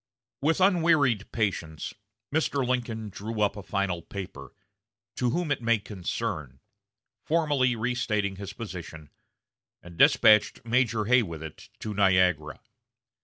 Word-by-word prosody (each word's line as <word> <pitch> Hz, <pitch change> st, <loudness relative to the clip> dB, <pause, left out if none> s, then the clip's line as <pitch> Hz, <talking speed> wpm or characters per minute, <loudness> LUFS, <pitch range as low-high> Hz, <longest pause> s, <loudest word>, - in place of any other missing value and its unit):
With 160 Hz, +5 st, +2 dB
unwearied 160 Hz, -, +3 dB
patience, 85 Hz, -8 st, -2 dB, 0.4 s
Mr. 140 Hz, -4 st, +1 dB
Lincoln 115 Hz, -4 st, -2 dB
drew 110 Hz, +3 st, -6 dB
up 105 Hz, -1 st, +2 dB
a 105 Hz, -, -7 dB
final 95 Hz, -3 st, -2 dB
paper, 85 Hz, -8 st, -8 dB, 0.7 s
"To 125 Hz, -, +1 dB
Whom 170 Hz, +4 st, -1 dB
it -, -, 0 dB
may 115 Hz, -1 st, +3 dB
Concern," 80 Hz, -, -5 dB, 0.6 s
formally 145 Hz, -6 st, +2 dB
restating 110 Hz, -4 st, -1 dB
his 100 Hz, 0 st, -6 dB
position, 85 Hz, -8 st, -8 dB, 0.7 s
and 85 Hz, -1 st, -13 dB
despatched 105 Hz, +1 st, +5 dB
Major 115 Hz, -2 st, +1 dB
Hay 125 Hz, +3 st, +5 dB
with 85 Hz, -7 st, -6 dB
it 80 Hz, -, -10 dB
to 110 Hz, -, -4 dB
Niagara. 90 Hz, -6 st, +2 dB
105 Hz, 120 wpm, -27 LUFS, 90-125 Hz, 0.7 s, despatched